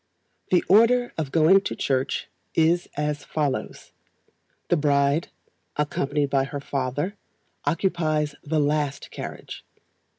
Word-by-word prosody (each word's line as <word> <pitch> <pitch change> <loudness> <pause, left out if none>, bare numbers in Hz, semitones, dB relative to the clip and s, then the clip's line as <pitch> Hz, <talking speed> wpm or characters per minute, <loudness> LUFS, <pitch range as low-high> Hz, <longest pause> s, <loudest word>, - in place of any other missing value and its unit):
The 180 - +3
order 235 +5 +5
of 150 -4 -3
going 165 +5 +5
to - - -4
church 130 -1 -1 0.3
is 165 +2 +2
as 150 0 -1
follows: 145 -4 -3 0.8
The - - +4
BRIDE, 145 +2 +2 0.5
accompanied 145 -1 -1
by 135 -1 +2
her 140 +1 -5
father, 140 +7 -2 0.5
occupies 155 -2 0
the 155 +1 0
last 145 -1 -1
carriage. - - -7
150 Hz, 110 wpm, -25 LUFS, 140-165 Hz, 0.8 s, order